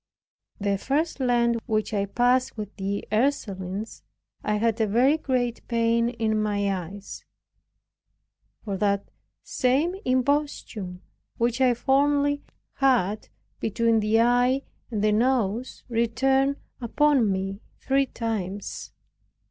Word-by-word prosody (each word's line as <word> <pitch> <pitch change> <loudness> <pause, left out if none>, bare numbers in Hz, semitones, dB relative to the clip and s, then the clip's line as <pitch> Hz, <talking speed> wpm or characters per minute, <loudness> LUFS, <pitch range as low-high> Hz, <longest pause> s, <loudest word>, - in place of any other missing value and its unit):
The 200 -1 0
first 295 +6 -1
Lent 240 -2 +2
which 215 0 -1
I 200 -1 0
passed 245 +4 +2
with 210 -1 -6
the 200 +1 -3
Ursulines, 210 -5 -1 0.4
I 210 - 0
had 225 +1 +1
a 220 - +2
very 250 +8 +4
great 250 -6 -1
pain 230 0 +2
in 220 -3 0
my 205 -2 0
eyes; 200 +2 -9 1.4
for 200 -3 -3
that 200 0 +1 0.4
same 275 +8 +1
imposthume 255 -8 -1 0.4
which 235 +2 0
I 250 -2 +4
formerly 285 +3 +2 0.4
had 225 -7 +2 0.3
between 230 +1 +2
the 215 +1 +3
eye 245 +3 +3 0.3
and 215 -4 -2
the 215 - +4
nose, 235 0 0
returned 265 +4 +2 0.3
upon 260 -2 +3
me 195 +2 -3 0.2
three 275 0 +1
times. 205 -5 -4
230 Hz, 115 wpm, -25 LUFS, 210-260 Hz, 1.4 s, very